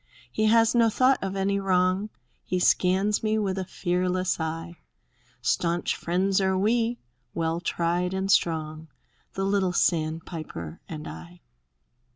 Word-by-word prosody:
He 215 Hz, -, 0 dB
has 225 Hz, +1 st, +4 dB
no 230 Hz, -2 st, +4 dB
thought 255 Hz, +4 st, +3 dB
of 195 Hz, 0 st, -3 dB
any 195 Hz, +1 st, 0 dB
wrong; 185 Hz, +1 st, +1 dB, 0.3 s
He 185 Hz, -, -2 dB
scans 190 Hz, +3 st, +2 dB
me 215 Hz, 0 st, +1 dB
with 195 Hz, -3 st, -1 dB
a 190 Hz, -, -3 dB
fearless 180 Hz, +1 st, -1 dB
eye; 165 Hz, +2 st, -4 dB, 0.7 s
Stanch 170 Hz, +4 st, 0 dB
friends 190 Hz, +3 st, 0 dB
are 190 Hz, 0 st, +1 dB
we, 230 Hz, +4 st, +1 dB, 0.4 s
well 165 Hz, 0 st, -1 dB
tried 175 Hz, +1 st, -1 dB
and 190 Hz, +1 st, -1 dB
strong. 160 Hz, -3 st, 0 dB, 0.5 s
The 195 Hz, -, -2 dB
little 195 Hz, -2 st, +1 dB
sandpiper 155 Hz, -, -2 dB
and 155 Hz, -2 st, -6 dB
I. 85 Hz, +2 st, -10 dB
185 Hz, 135 wpm, -26 LUFS, 165-195 Hz, 0.7 s, has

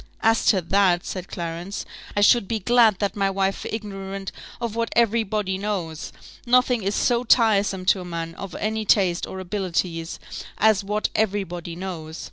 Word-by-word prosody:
"As 225 Hz, 0 st, +3 dB
to 190 Hz, -4 st, +5 dB
that," 180 Hz, 0 st, +2 dB
said 185 Hz, -1 st, -5 dB
Clarence, 170 Hz, +3 st, -5 dB, 0.3 s
"I -, -, +3 dB
should 205 Hz, 0 st, +5 dB
be 225 Hz, -, -1 dB
glad 225 Hz, 0 st, +4 dB
that 200 Hz, 0 st, -1 dB
my 195 Hz, -1 st, +1 dB
wife 195 Hz, 0 st, -1 dB
were -, -, -5 dB
ignorant 195 Hz, -2 st, -5 dB, 0.3 s
of 235 Hz, -2 st, -3 dB
what 230 Hz, 0 st, -1 dB
every 235 Hz, -1 st, +3 dB
body 200 Hz, -3 st, -2 dB
knows. 185 Hz, -7 st, -3 dB, 0.4 s
Nothing 250 Hz, -1 st, +4 dB
is 200 Hz, +1 st, -1 dB
so 240 Hz, -1 st, +2 dB
tiresome 205 Hz, -6 st, +3 dB
to 185 Hz, 0 st, +3 dB
a -, -, -8 dB
man 165 Hz, -1 st, -5 dB
of 195 Hz, +1 st, -8 dB
any 220 Hz, +1 st, -2 dB
taste 190 Hz, -4 st, +2 dB
or 190 Hz, -, -7 dB
abilities 180 Hz, -3 st, -2 dB, 0.4 s
as 215 Hz, -1 st, +4 dB
what 210 Hz, +2 st, -1 dB
every 205 Hz, -2 st, +1 dB
body 175 Hz, -2 st, -7 dB
knows. 170 Hz, -3 st, -6 dB
195 Hz, 175 wpm, -23 LUFS, 180-215 Hz, 0.4 s, to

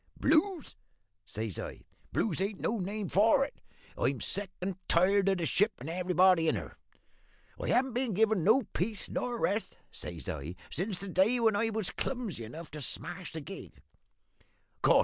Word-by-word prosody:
"`Blues?' 325 Hz, 0 st, +2 dB, 0.5 s
says 110 Hz, -4 st, -3 dB
I. -, -, -6 dB, 0.3 s
`Blues 190 Hz, -5 st, 0 dB
ain't 200 Hz, 0 st, -3 dB
no 225 Hz, 0 st, 0 dB
name 200 Hz, +2 st, -3 dB
for 225 Hz, +10 st, +4 dB
it! -, -, -12 dB, 0.3 s
I'm -, -, 0 dB
sick 200 Hz, -1 st, -3 dB
and 185 Hz, +1 st, -2 dB
tired 195 Hz, +3 st, +4 dB
of 195 Hz, -, +2 dB
the 170 Hz, -, -1 dB
ship, 205 Hz, +6 st, +2 dB
and 130 Hz, -, -8 dB
everybody 180 Hz, -1 st, +4 dB
in -, -, +3 dB
her. -, -, -6 dB, 0.9 s
I -, -, -3 dB
haven't 260 Hz, 0 st, +2 dB
been 245 Hz, -4 st, 0 dB
given 215 Hz, -3 st, +3 dB
no 225 Hz, +9 st, +5 dB
peace 210 Hz, +2 st, -3 dB
nor 245 Hz, -1 st, -1 dB
rest,' 210 Hz, +3 st, -1 dB
says 80 Hz, -6 st, -7 dB
I, 75 Hz, +6 st, -4 dB, 0.2 s
`since 190 Hz, +4 st, -1 dB
the 200 Hz, -, -5 dB
day 195 Hz, +7 st, +3 dB
when 225 Hz, -3 st, +4 dB
I 225 Hz, +2 st, +2 dB
was 220 Hz, -3 st, -1 dB
clumsy 230 Hz, -, -3 dB
enough 155 Hz, +8 st, -9 dB
to 150 Hz, 0 st, -6 dB
smash 175 Hz, +6 st, -2 dB
the 160 Hz, -, -5 dB
gig. 195 Hz, +7 st, -9 dB
195 Hz, 170 wpm, -31 LUFS, 175-225 Hz, 0.9 s, no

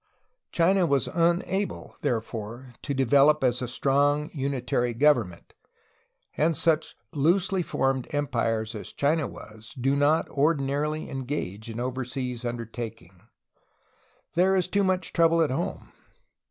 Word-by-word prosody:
China 180 Hz, +1 st, +3 dB
was 140 Hz, -3 st, +1 dB
unable 175 Hz, +4 st, -1 dB
therefore 120 Hz, -1 st, -4 dB
to 145 Hz, -, -5 dB
develop 140 Hz, +3 st, +4 dB
as 125 Hz, -1 st, +1 dB
a 125 Hz, -, -2 dB
strong 145 Hz, +4 st, +1 dB
unitary 125 Hz, -4 st, -1 dB
government, 120 Hz, -, +1 dB, 0.8 s
and 160 Hz, +1 st, +1 dB
such 160 Hz, -2 st, +2 dB, 0.2 s
loosely 180 Hz, +6 st, +2 dB
formed 135 Hz, -5 st, -1 dB
empires 115 Hz, -6 st, -1 dB
as 105 Hz, -, -7 dB
China 150 Hz, +1 st, +1 dB
was 110 Hz, +1 st, -12 dB
do 135 Hz, +3 st, +2 dB
not 145 Hz, +3 st, +2 dB
ordinarily 150 Hz, +1 st, 0 dB
engage 125 Hz, -6 st, -4 dB
in 115 Hz, +1 st, -6 dB
over 130 Hz, +1 st, -2 dB
seas 125 Hz, -1 st, -4 dB
undertakings; 115 Hz, -6 st, -6 dB, 1.1 s
there 185 Hz, +3 st, +3 dB
is 185 Hz, -1 st, +1 dB
too 200 Hz, +2 st, +1 dB
much 185 Hz, -1 st, 0 dB
trouble 165 Hz, -1 st, +4 dB
at 160 Hz, -4 st, +2 dB
home. 130 Hz, -, -4 dB
140 Hz, 125 wpm, -26 LUFS, 120-160 Hz, 1.1 s, develop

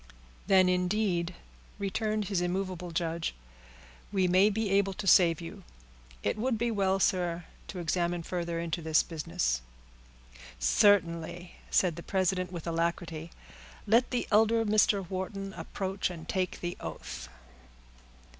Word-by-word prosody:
"Then, 190 Hz, -1 st, +6 dB
indeed," 180 Hz, -1 st, +1 dB, 0.4 s
returned 215 Hz, +1 st, -1 dB
his 195 Hz, -3 st, 0 dB
immovable 180 Hz, 0 st, -2 dB
judge, 165 Hz, -, -2 dB, 0.8 s
"we 190 Hz, -3 st, +2 dB
may 185 Hz, +3 st, +5 dB
be 215 Hz, -1 st, -1 dB
able 195 Hz, 0 st, +3 dB
to 210 Hz, +1 st, -6 dB
save 175 Hz, -3 st, +6 dB
you. 165 Hz, -, -8 dB, 0.6 s
It -, -, 0 dB
would 245 Hz, 0 st, +1 dB
be 235 Hz, +1 st, 0 dB
well, 195 Hz, -2 st, +1 dB
sir, 175 Hz, -3 st, +1 dB, 0.2 s
to 190 Hz, -, -7 dB
examine 175 Hz, 0 st, -1 dB
further 170 Hz, -1 st, -3 dB
into 170 Hz, 0 st, -2 dB
this 160 Hz, -1 st, +3 dB
business." 165 Hz, -, -1 dB, 1.0 s
"Certainly," 175 Hz, -, +2 dB, 0.2 s
said 175 Hz, -4 st, +2 dB
the -, -, -5 dB
president, 185 Hz, 0 st, 0 dB
with 170 Hz, -3 st, -6 dB
alacrity. 165 Hz, -1 st, -2 dB, 0.6 s
"Let 230 Hz, +4 st, +4 dB
the 245 Hz, -, -1 dB
elder 225 Hz, +2 st, +4 dB
Mr. 205 Hz, -2 st, +3 dB
Wharton 195 Hz, +1 st, -4 dB
approach 190 Hz, 0 st, -3 dB
and 165 Hz, -2 st, -8 dB
take 185 Hz, -1 st, -2 dB
the 175 Hz, 0 st, -3 dB
oath." -, -, -7 dB
185 Hz, 130 wpm, -30 LUFS, 170-200 Hz, 1.0 s, Then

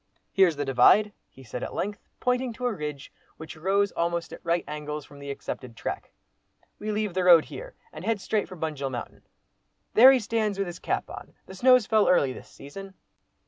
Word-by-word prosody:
"Here's 185 Hz, -5 st, +4 dB
the 145 Hz, 0 st, -3 dB
Divide!" 135 Hz, +11 st, +5 dB, 0.2 s
he 130 Hz, -, -16 dB
said 120 Hz, +1 st, -7 dB
at -, -, -5 dB
length, 205 Hz, +1 st, -3 dB, 0.2 s
pointing 250 Hz, -1 st, 0 dB
to 250 Hz, +2 st, -6 dB
a 245 Hz, -, +1 dB
ridge 150 Hz, -5 st, -6 dB, 0.2 s
which 160 Hz, 0 st, -9 dB
rose 195 Hz, +4 st, +1 dB
almost 170 Hz, 0 st, -2 dB
at -, -, -11 dB
right 170 Hz, 0 st, 0 dB
angles 150 Hz, 0 st, -5 dB
from 145 Hz, -, -15 dB
the 140 Hz, 0 st, -8 dB
accepted 130 Hz, -3 st, -6 dB
track. -, -, -5 dB, 0.7 s
"We 215 Hz, +1 st, -3 dB
leave 210 Hz, -2 st, -2 dB
the 185 Hz, 0 st, 0 dB
road 170 Hz, -3 st, +7 dB
here, -, -, -9 dB, 0.2 s
and -, -, -9 dB
head 225 Hz, -2 st, 0 dB
straight 205 Hz, +2 st, -1 dB
for 185 Hz, -, -10 dB
Bunjil 150 Hz, -4 st, -3 dB
mountain. 120 Hz, -2 st, -7 dB, 0.7 s
There 255 Hz, +4 st, +9 dB
he 265 Hz, -, +4 dB
stands 215 Hz, -2 st, -1 dB
with 195 Hz, -, 0 dB
his 175 Hz, -1 st, -7 dB
cap -, -, -2 dB
on! -, -, -10 dB
The -, -, -11 dB
snow's 250 Hz, +3 st, +5 dB
fell 215 Hz, -1 st, +3 dB
early 140 Hz, -7 st, +3 dB
this -, -, -12 dB
season." 190 Hz, +7 st, -11 dB
185 Hz, 200 wpm, -26 LUFS, 150-215 Hz, 0.7 s, There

